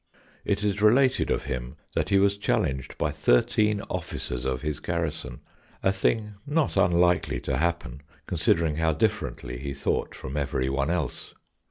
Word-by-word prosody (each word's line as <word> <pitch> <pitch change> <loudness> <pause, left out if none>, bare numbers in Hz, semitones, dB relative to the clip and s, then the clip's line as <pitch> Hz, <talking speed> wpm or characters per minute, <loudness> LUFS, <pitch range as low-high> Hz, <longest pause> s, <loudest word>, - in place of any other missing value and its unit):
It 105 0 0
is 100 -1 0
related 125 +5 +4
of - - 0
him 60 0 -4 0.2
that - - 0
he 100 - +4
was 100 +1 +3
challenged 65 -9 -1
by - - 0
thirteen 105 +11 +2
officers 60 0 -4
of 65 0 -2
his 75 -1 -2
garrison, 85 -2 -3 0.4
a 95 - +4
thing 105 +2 0
not 150 0 +1
unlikely 90 -7 +3
to 65 - -1
happen 85 -5 -1 0.2
considering 80 -2 +1
how 80 0 +2
differently - - -1
he 70 +1 -5
thought 70 - -1
from 65 +3 -6
every 65 -2 0
one 70 +2 0
else. 85 -7 -3
80 Hz, 155 wpm, -26 LUFS, 65-100 Hz, 0.4 s, related